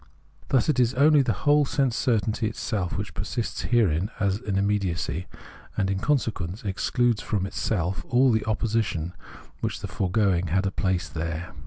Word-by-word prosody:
Thus 130 -4 +3
it 150 -4 +2
is 125 +1 +3
only 145 +2 +6
the 125 -3 +1
whole 145 0 +5
sense 135 -3 0
certainty 110 -2 +1
itself 105 -4 -2
which 100 -4 -4
persists 120 +8 -3
therein 100 -6 +3
as 100 0 +1
immediacy, 100 - -1 0.5
and 95 -1 +1
in 95 - -1
consequence 110 - -1
excludes 110 +3 +1
from 100 -3 -1
itself 95 -2 -2
all 125 +1 +4
the 110 - +3
opposi 110 +1 +1
tion 85 -3 -4 0.5
which - - -2
in - - -12
the - - -4
foregoing 95 -2 +1
had 95 +4 +1
a 95 - 0
place 95 -4 0
there. 80 +3 -4
105 Hz, 165 wpm, -26 LUFS, 90-120 Hz, 0.5 s, only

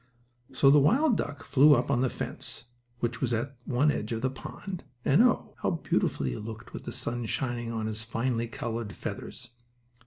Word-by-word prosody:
So 135 - +5
the 145 - +7
wild 240 - +4
duck 145 -7 -3
flew 145 +2 +6
up 125 +2 0
on 125 -3 +2
the 130 - +2
fence, - - -5 0.4
which 120 0 -1
was 125 -2 +1
at 125 +5 -2
one 135 +4 +3
edge 105 -4 -3
of 115 0 -2
the 130 - +1
pond, 180 +6 -7 0.2
and, 145 +10 +5
oh, 245 -2 +3
how - - +2
beautiful 160 - 0
he 60 -2 -1
looked 110 +1 -8
with - - -7
the - - -4
sun 120 -1 -3
shining 120 -3 -2
on 110 -1 -2
his 110 0 -3
finely 115 +1 -1
colored 115 -2 -4
feathers. 120 -2 -7
120 Hz, 190 wpm, -29 LUFS, 115-140 Hz, 0.4 s, the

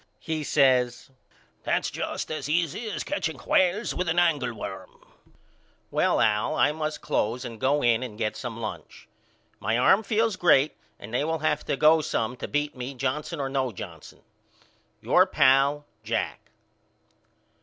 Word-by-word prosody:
He 160 -2 -3
says 130 -3 +2 0.5
That's - - -1
just - - -4
as 155 -1 -4
easy 170 +7 -1
as - - -4
catching 165 - -3
whales 185 - +1
with 180 -1 -2
a - - +2
angleworm. 125 - -1 0.9
Well - - +2
Al 105 +7 +2
I 145 - +3
must 155 0 -4
close 120 +4 -1
and 115 -2 -8
go 140 +3 +2
in 120 -1 +3
and 120 -5 -6
get 110 -1 -2
some 115 -3 -6
lunch. 110 -2 -7 0.5
My 110 +3 0
arm 190 - +5
feels 220 -1 0
great 155 -5 +4 0.2
and 105 +3 -11
they 125 - +1
will 160 +1 -1
have 150 -1 +1
to - - -1
go 155 +3 +5
some 120 -4 -2
to - - -5
beat 145 0 -2
me 130 +2 -6
Johnson 145 +5 -3
or 135 - -1
no 135 -2 -1
Johnson. 95 - -10 0.8
Your - - +4
pal, 140 +2 +3 0.2
JACK. 115 +1 -3
140 Hz, 155 wpm, -26 LUFS, 120-160 Hz, 0.9 s, arm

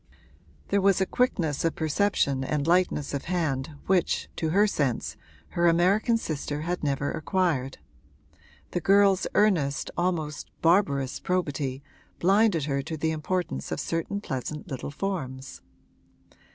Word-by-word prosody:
There 200 0 +2
was 195 -1 +4
a 190 - +2
quickness 175 - 0
of 165 - +1
perception 155 -5 +1
and 145 +1 -1
lightness 170 -5 +1
of 140 - -3
hand 155 -5 -1
which, 185 -2 +1
to 160 - 0
her 200 +6 +4
sense, 140 - -1 0.3
her 170 0 +2
American 190 +7 +3
sister 150 -6 -4
had 175 +2 -3
never 140 -1 0
acquired: 160 -6 -1 0.9
the 175 - -1
girl's 195 +1 +4
earnest, 165 -10 +2
almost 165 -4 -2
barbarous 145 -7 +2
probity 145 -7 -2 0.3
blinded 195 -3 +3
her 140 -1 -1
to 160 +3 -5
the 160 +1 0
importance 160 - -3
of - - -2
certain 165 +5 -2
pleasant 150 0 -5
little 130 -1 -4
forms. 140 -6 -5
160 Hz, 130 wpm, -27 LUFS, 140-185 Hz, 0.9 s, was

